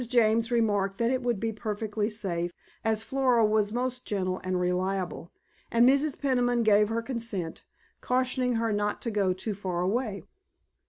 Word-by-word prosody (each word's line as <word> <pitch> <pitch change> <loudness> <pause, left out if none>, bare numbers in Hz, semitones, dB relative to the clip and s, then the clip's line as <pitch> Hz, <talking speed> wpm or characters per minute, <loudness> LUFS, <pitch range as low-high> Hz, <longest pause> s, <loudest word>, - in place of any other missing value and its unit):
James 230 -1 +3
remarked 205 -5 +1
that 235 +1 +1
it 260 0 0
would 240 -4 0
be 225 +1 -2
perfectly 215 -1 -2
safe, 175 -6 -3 0.3
as 220 -1 +1
Flora 255 -2 +2
was 210 -1 +2
most 250 +1 -2
gentle 185 -2 -2
and 185 0 -1
reliable, 180 -1 -2 0.4
and 235 +1 +5
Mrs. 280 +2 +2
Peniman 245 -3 +2
gave 210 -1 +4
her 230 +1 -1
consent, 230 -9 -3 0.4
cautioning 255 -1 +1
her 225 -1 0
not 205 0 -1
to 230 - -2
go 200 -3 +1
too 190 +4 -3
far 185 -3 -3
away. 200 +1 -1
220 Hz, 160 wpm, -28 LUFS, 195-240 Hz, 0.4 s, and